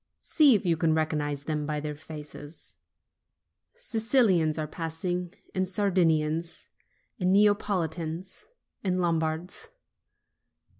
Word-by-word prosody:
See 295 Hz, -6 st, +5 dB
if 200 Hz, -, -1 dB
you 170 Hz, -2 st, +2 dB
can 160 Hz, -1 st, +2 dB
recognize 150 Hz, -3 st, -1 dB
them 150 Hz, 0 st, -2 dB
by 150 Hz, -1 st, -1 dB
their 150 Hz, 0 st, -4 dB
faces: 150 Hz, 0 st, -10 dB, 1.0 s
Sicilians 225 Hz, -, +2 dB
are 155 Hz, -, -1 dB
passing, 170 Hz, +3 st, -4 dB, 0.2 s
and 185 Hz, -1 st, -1 dB
Sardinians, 170 Hz, -4 st, +1 dB, 0.5 s
and 180 Hz, -1 st, +2 dB
Neapolitans, 185 Hz, -, 0 dB, 0.4 s
and 185 Hz, -2 st, 0 dB
Lombards. 170 Hz, -, -1 dB
165 Hz, 100 wpm, -28 LUFS, 155-190 Hz, 1.0 s, See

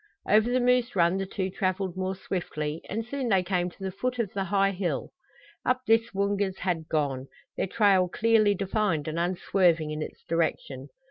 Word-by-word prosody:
Over 215 Hz, +3 st, +4 dB
the 255 Hz, +1 st, +2 dB
moose 250 Hz, -1 st, +2 dB
run 175 Hz, 0 st, +3 dB
the 195 Hz, 0 st, -2 dB
two 190 Hz, -1 st, -3 dB
traveled 185 Hz, -1 st, -1 dB
more 190 Hz, 0 st, -2 dB
swiftly 160 Hz, -5 st, -4 dB
and 220 Hz, +3 st, -3 dB
soon 260 Hz, 0 st, -3 dB
they 190 Hz, -3 st, +3 dB
came 180 Hz, -1 st, 0 dB
to 185 Hz, -, -13 dB
the 190 Hz, -, -2 dB
foot 250 Hz, +6 st, -3 dB
of 225 Hz, -5 st, -2 dB
the 195 Hz, -1 st, -1 dB
high 195 Hz, 0 st, +2 dB
hill. 180 Hz, -6 st, -3 dB, 0.5 s
Up 255 Hz, 0 st, +1 dB
this 225 Hz, +1 st, +3 dB
the 195 Hz, -, -10 dB
Woongas 200 Hz, -1 st, 0 dB
had 170 Hz, -4 st, -2 dB
gone, 140 Hz, -4 st, -1 dB, 0.3 s
their -, -, -1 dB
trail 195 Hz, -3 st, +3 dB
clearly 215 Hz, 0 st, +3 dB
defined 195 Hz, -5 st, 0 dB
and 155 Hz, +2 st, -2 dB
unswerving 175 Hz, -2 st, +1 dB
in 150 Hz, 0 st, -4 dB
its -, -, -7 dB
direction. 145 Hz, -5 st, -2 dB
190 Hz, 190 wpm, -27 LUFS, 170-210 Hz, 0.5 s, Over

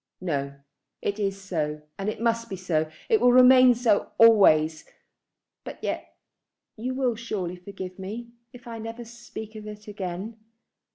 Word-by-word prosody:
"No. 140 Hz, -6 st, -3 dB, 0.5 s
It 205 Hz, +1 st, -2 dB
is 195 Hz, -1 st, -1 dB
so, 150 Hz, -6 st, -3 dB, 0.2 s
and 195 Hz, +2 st, -1 dB
it 215 Hz, -, -5 dB
must 230 Hz, 0 st, 0 dB
be 195 Hz, -, -4 dB
so. 160 Hz, -4 st, -1 dB, 0.2 s
It 445 Hz, -3 st, +3 dB
will 245 Hz, -, +6 dB
remain 255 Hz, 0 st, +7 dB
so 230 Hz, -3 st, +1 dB
always, 160 Hz, -9 st, +6 dB, 0.8 s
but -, -, -8 dB
yet -, -, -4 dB, 0.6 s
you 250 Hz, +4 st, -4 dB
will 255 Hz, -2 st, +1 dB
surely 205 Hz, -6 st, -4 dB
forgive 185 Hz, 0 st, -9 dB
me, 225 Hz, +5 st, -7 dB, 0.2 s
if 245 Hz, 0 st, -14 dB
I 230 Hz, -1 st, -6 dB
never 225 Hz, +2 st, -7 dB
speak 230 Hz, -2 st, -9 dB
of 215 Hz, -1 st, -8 dB
it 210 Hz, 0 st, -10 dB
again. 200 Hz, +2 st, -6 dB
210 Hz, 155 wpm, -26 LUFS, 185-235 Hz, 0.8 s, remain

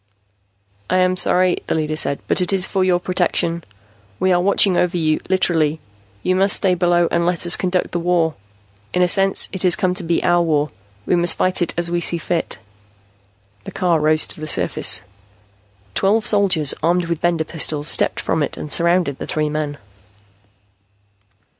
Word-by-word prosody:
"I -, -, +1 dB
am 185 Hz, 0 st, +2 dB
sorry," 180 Hz, 0 st, +2 dB
the -, -, -1 dB
leader 155 Hz, -1 st, -2 dB
said, 140 Hz, -2 st, -1 dB
"but -, -, +1 dB
it 180 Hz, -, +1 dB
is 190 Hz, -2 st, +1 dB
for 190 Hz, -1 st, -1 dB
your 180 Hz, -1 st, +2 dB
protection. 175 Hz, -2 st, -1 dB, 0.6 s
We 185 Hz, -, +1 dB
are 175 Hz, -1 st, +2 dB
watching 195 Hz, 0 st, +3 dB
over 180 Hz, 0 st, 0 dB
you, 155 Hz, -2 st, 0 dB
literally. 160 Hz, -5 st, +1 dB, 0.4 s
You 185 Hz, -, +1 dB
must 195 Hz, +2 st, +3 dB
stay 190 Hz, -2 st, +1 dB
below 175 Hz, -1 st, +2 dB
and 170 Hz, -, +1 dB
let 175 Hz, 0 st, -1 dB
us 175 Hz, -, +5 dB
conduct 185 Hz, 0 st, -2 dB
the 175 Hz, -, -2 dB
war. 170 Hz, -2 st, 0 dB, 0.6 s
In 180 Hz, -, +3 dB
a -, -, +3 dB
sense, 195 Hz, +2 st, +2 dB
it 190 Hz, -, -5 dB
has 180 Hz, -2 st, +4 dB
come 185 Hz, -1 st, 0 dB
to 185 Hz, -, -7 dB
be 170 Hz, 0 st, -1 dB
our 175 Hz, -1 st, +3 dB
war. 150 Hz, -3 st, 0 dB, 0.4 s
We -, -, +1 dB
must 175 Hz, 0 st, +1 dB
fight 185 Hz, 0 st, 0 dB
it 175 Hz, -, -1 dB
as 170 Hz, 0 st, -1 dB
we 175 Hz, 0 st, -1 dB
see 170 Hz, -, +2 dB
fit." 165 Hz, +1 st, -3 dB, 1.1 s
The -, -, -7 dB
car 175 Hz, -4 st, 0 dB
rose 155 Hz, +1 st, +3 dB
to -, -, -8 dB
the 155 Hz, -, -5 dB
surface. 110 Hz, -7 st, +1 dB, 0.9 s
Twelve 210 Hz, -, +1 dB
soldiers, 180 Hz, -8 st, +2 dB
armed 175 Hz, +2 st, +1 dB
with 170 Hz, -1 st, -4 dB
Bender 170 Hz, -2 st, +1 dB
pistols, 150 Hz, -2 st, +1 dB
stepped -, -, +1 dB
from 160 Hz, -, -1 dB
it 145 Hz, -, -1 dB
and 150 Hz, -, -7 dB
surrounded 170 Hz, -4 st, +1 dB
the -, -, -6 dB
three 155 Hz, -1 st, -1 dB
men. 150 Hz, -1 st, -4 dB
175 Hz, 185 wpm, -19 LUFS, 160-185 Hz, 1.1 s, us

